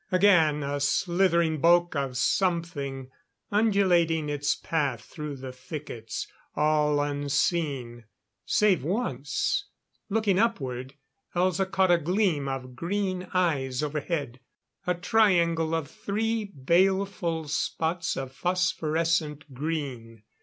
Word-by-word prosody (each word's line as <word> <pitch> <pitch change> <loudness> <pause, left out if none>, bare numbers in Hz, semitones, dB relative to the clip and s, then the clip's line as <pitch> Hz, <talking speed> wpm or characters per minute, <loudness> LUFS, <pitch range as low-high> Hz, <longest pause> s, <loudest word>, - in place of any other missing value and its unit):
Again, 170 -6 +4
a 140 +1 -2
slithering 170 +1 +2
bulk 175 +1 +4
of 135 -3 -2
something, 145 -6 -1 0.4
undulating 180 -7 +3
its 145 0 0
path 140 -8 -1
through 150 -2 -7
the 130 -1 -7
thickets. 130 -3 -6 0.3
All 150 -1 +2
unseen. 145 -4 -1 0.4
Save 200 -9 +2
once. 185 - -1 0.4
Looking 205 -3 +2
upward, 135 - -1 0.4
Elza 185 +1 +1
caught 190 -1 +3
a 175 - +5
gleam 170 -4 +1
of 130 -2 -5
green 185 +4 -2
eyes 150 -8 0
overhead. 145 -3 -3 0.5
A 180 - +2
triangle 170 -5 +2
of 160 -3 -2
three 220 +1 -1
baleful 175 +1 +1
spots 165 +3 -1
of 135 -1 -4
phosphorescent 160 -3 0
green. 130 -7 -4
160 Hz, 105 wpm, -27 LUFS, 140-185 Hz, 0.5 s, a